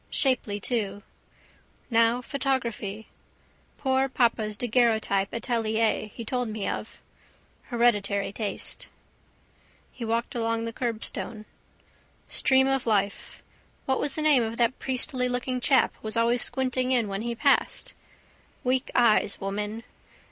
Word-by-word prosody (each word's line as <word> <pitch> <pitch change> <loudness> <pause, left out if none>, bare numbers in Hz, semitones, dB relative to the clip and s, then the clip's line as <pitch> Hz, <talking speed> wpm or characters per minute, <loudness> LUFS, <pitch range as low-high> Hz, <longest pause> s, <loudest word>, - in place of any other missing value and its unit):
Shapely 240 -6 0
too. 205 -3 -2 0.9
Now 230 +2 +3
photography. 235 -7 -2 0.7
Poor 265 0 +1
papa's 225 -4 +1
daguerreotype 220 -5 +1
atelier 225 -2 0
he 230 +2 -9
told 245 0 -2
me 215 -2 -3
of. - - -5 0.7
Hereditary 205 -5 +1
taste. 210 0 -3 1.0
He 245 - -8
walked 230 +4 -1
along 230 -1 -1
the 230 - -4
curbstone. 225 -2 -2 0.8
Stream 265 -2 +4
of 270 -2 0
life. 200 -2 -1 0.4
What 265 -1 +1
was 285 -2 -2
the 310 - -2
name 295 -5 +5
of 225 0 -3
that 240 +1 +1
priestylooking 250 -1 0
chap 260 0 +3
was 220 +1 -2
always 235 +1 +3
squinting 255 -1 0
in 240 -4 +2
when 195 0 -3
he 235 +1 -3
passed? - - +1 0.7
Weak 255 +1 0
eyes, 215 -4 +3
woman. 210 +3 -4
235 Hz, 120 wpm, -26 LUFS, 215-255 Hz, 1.0 s, name